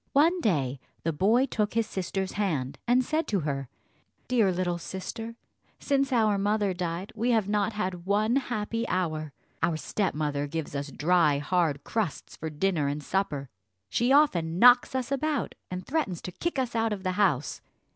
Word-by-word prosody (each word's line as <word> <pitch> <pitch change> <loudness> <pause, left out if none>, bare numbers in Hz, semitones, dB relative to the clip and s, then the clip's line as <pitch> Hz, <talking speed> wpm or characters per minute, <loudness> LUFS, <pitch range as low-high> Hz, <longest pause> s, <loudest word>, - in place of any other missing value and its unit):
One 330 +6 +4
day 140 - 0 0.2
the 165 - 0
boy 220 - +3
took 210 -5 -1
his 230 -1 +2
sister's 190 -1 -3
hand, 155 -11 -2
and 250 +1 +4
said 315 +4 0
to 200 -4 0
her, 135 -3 -3 0.6
"Dear 225 -6 +3
little 175 -1 -1
sister, 225 +6 -6 0.4
since 275 -1 +1
our 215 -5 +3
mother 205 -1 +1
died 175 +1 -4
we 230 +3 -1
have 220 -5 +2
not 210 +1 +1
had 185 -4 -3
one 215 +5 +2
happy 230 -2 -2
hour. 155 -4 -1 0.3
Our 165 -2 +1
stepmother 150 -5 -1
gives 160 0 -4
us 140 +1 -3
dry 160 -1 +3
hard 150 -1 0
crusts 215 -9 -3
for 160 - -5
dinner 155 -1 0
and 145 +1 -3
supper; 145 -7 -2 0.4
she 240 +2 +1
often 175 - +3
knocks 245 +4 +6
us 260 0 -2
about, 295 +2 -1 0.2
and 180 0 -5
threatens 270 - -1
to 180 - -5
kick 340 - -3
us 255 -3 -1
out 225 -1 +1
of 195 -2 -6
the 185 - 0
house. 180 -8 +1
195 Hz, 170 wpm, -28 LUFS, 160-230 Hz, 0.6 s, knocks